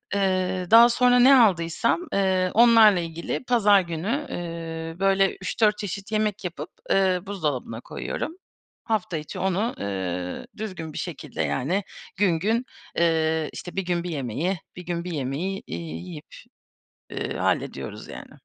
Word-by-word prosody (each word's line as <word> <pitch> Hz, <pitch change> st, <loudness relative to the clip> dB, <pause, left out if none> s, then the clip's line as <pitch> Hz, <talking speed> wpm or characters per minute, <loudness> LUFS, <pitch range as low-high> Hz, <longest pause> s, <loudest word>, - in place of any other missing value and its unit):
Eee, 185 Hz, -2 st, 0 dB
daha 235 Hz, +1 st, +9 dB
sonra 245 Hz, +1 st, +4 dB
ne 265 Hz, +2 st, +8 dB
aldıysam, 200 Hz, -, +3 dB
eee, 190 Hz, -2 st, +2 dB
onlarla 225 Hz, -4 st, +7 dB
ilgili 165 Hz, +7 st, -4 dB
pazar 210 Hz, -5 st, +5 dB
günü, 185 Hz, -, -3 dB
eee, 165 Hz, -1 st, -5 dB
böyle 195 Hz, 0 st, +3 dB
3-4 210 Hz, +2 st, +2 dB
çeşit 200 Hz, +1 st, -6 dB
yemek 215 Hz, -2 st, 0 dB
yapıp, 160 Hz, -2 st, -5 dB, 0.2 s
eee, 190 Hz, -2 st, +3 dB
buzdolabına 145 Hz, -, -3 dB
koyuyorum. 320 Hz, -, -5 dB, 0.5 s
Hafta 205 Hz, -7 st, -1 dB
içi 150 Hz, -, -7 dB
onu, 190 Hz, +5 st, 0 dB
eee, 90 Hz, -3 st, -4 dB
düzgün 185 Hz, -8 st, -6 dB
bir -, -, -7 dB
şekilde 170 Hz, -5 st, -5 dB
yani 175 Hz, +10 st, -1 dB, 0.3 s
gün 180 Hz, -5 st, +2 dB
gün, 225 Hz, +7 st, 0 dB, 0.3 s
eee, 160 Hz, -2 st, +2 dB
işte, 180 Hz, -, -8 dB
bir 195 Hz, -, 0 dB
gün 175 Hz, -1 st, -1 dB
bir 180 Hz, -, -4 dB
yemeği, 155 Hz, -, -2 dB, 0.2 s
bir 180 Hz, -, -9 dB
gün 170 Hz, -1 st, -3 dB
bir 180 Hz, -, -5 dB
yemeği, 155 Hz, +7 st, -3 dB
iii, 80 Hz, -1 st, -5 dB
yiyip, 150 Hz, -2 st, -10 dB, 0.8 s
ııı, -, -, -3 dB
hallediyoruz, -, -, -2 dB
yani. -, -, -9 dB
180 Hz, 145 wpm, -25 LUFS, 160-205 Hz, 0.8 s, daha